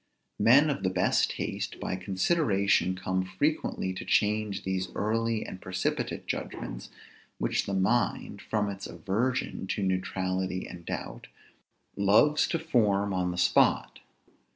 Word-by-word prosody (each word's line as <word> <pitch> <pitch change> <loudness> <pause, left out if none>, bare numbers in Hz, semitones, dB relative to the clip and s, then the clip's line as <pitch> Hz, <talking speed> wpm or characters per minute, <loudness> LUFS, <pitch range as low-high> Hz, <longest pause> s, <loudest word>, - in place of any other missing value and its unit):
Men 140 +6 +6
of 140 - -3
the 95 - +1
best 90 -1 +2
taste - - -4
by - - -2
consideration 95 - +1
come 95 0 -1
frequently 95 -3 -1
to 95 - -6
change 105 -1 +1
these 95 -1 -1
early 115 +1 0
and 95 - -8
precipitate 95 0 -2
judgments, - - -5 0.5
which - - 0
the 100 - -1
mind, 100 +3 0
from 105 -2 -1
its 100 -1 -5
aversion 115 0 -2
to 100 - -2
neutrality 95 0 -1
and 85 -1 -11
doubt, - - -5 0.7
loves 105 +10 +4
to 165 - 0
form 105 -10 +1
on 90 -1 0
the 90 - -4
spot. 90 - +3
100 Hz, 130 wpm, -28 LUFS, 95-115 Hz, 0.7 s, Men